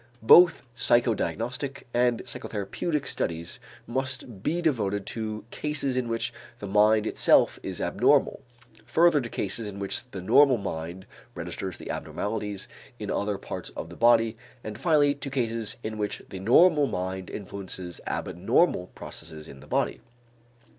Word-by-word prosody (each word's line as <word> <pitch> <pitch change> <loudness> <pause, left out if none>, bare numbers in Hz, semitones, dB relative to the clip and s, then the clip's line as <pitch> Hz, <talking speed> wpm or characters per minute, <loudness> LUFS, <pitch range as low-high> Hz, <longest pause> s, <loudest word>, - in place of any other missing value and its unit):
Both 165 +3 +7
psychodiagnostic 120 - +1
and 120 -1 +2
psychotherapeutic 140 - -3
studies 85 0 -3 0.3
must 130 -4 -4
be 165 - 0
devoted 105 - 0
to 110 -1 -4
cases 150 -3 -1
in 125 -2 0
which 115 0 -2 0.2
the - - -7
mind 105 +2 +4
itself - - +4
is - - -5
abnormal, - - +2 0.4
further 155 +6 +4
to 120 - -6
cases 105 +2 -2
in 100 - -10
which 100 +5 -3
the 95 -6 -7
normal 135 +5 +6
minds 90 -1 -5 0.3
registers 95 -3 -5
the - - -6
abnormalities 105 -2 -4 0.3
in - - -4
other 100 -1 -1
parts - - -6
of 80 - -6
the - - -9
body, 115 0 +4 0.3
and 110 0 -6
finally 145 -1 +4
to 140 -1 -7
cases 115 -4 -1
in 110 0 -4
which 105 -1 -3
the 95 - -7
normal 145 - +5
mind 95 -1 -4
influences 95 -3 -7
abnormal 90 - +1
processes 80 -1 -8
in 70 - -11
the 75 - -14
body. - - 0
110 Hz, 140 wpm, -27 LUFS, 95-130 Hz, 0.4 s, Both